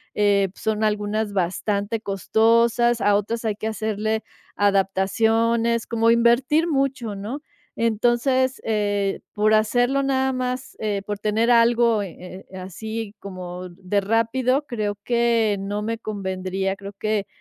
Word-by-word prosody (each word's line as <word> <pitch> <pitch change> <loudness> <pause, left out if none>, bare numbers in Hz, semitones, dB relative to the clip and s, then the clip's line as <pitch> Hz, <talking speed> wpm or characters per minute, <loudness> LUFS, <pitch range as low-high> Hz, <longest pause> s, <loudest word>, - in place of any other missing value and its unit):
eh, 200 -2 +3
son 220 0 -2
algunas 210 0 -1
bastante 200 +4 -1
costosas, 230 +4 +2
a 205 0 +4
otras 225 +3 -1
hay 215 -2 0
que 215 - -4
hacerle 220 0 -2 0.3
adaptaciones, 225 +4 +2
como 230 0 +2
invertir 240 +7 +3
mucho, 270 -8 -1
¿no? 215 +8 -5 0.4
Entonces, 240 +4 +1
eh, 205 -2 0
por 215 +1 +2
hacerlo 245 +5 +2
nada 265 -1 +1
más, 255 +1 -4
eh, 205 -2 -1
por 205 -1 -4
tener 220 +3 +1
algo, 235 -1 +4
eh, 185 0 -10
eh, 190 - -9
así 215 +4 -6
como 185 -2 -7
de 185 +3 -2
rápido, 240 +6 +1
creo 210 -4 -2
que 235 -3 +2
no 205 +1 -3
me 230 +1 -2
convendría, 190 -2 -3
creo 200 0 -9
que, 215 -1 -1
220 Hz, 130 wpm, -23 LUFS, 200-235 Hz, 0.4 s, a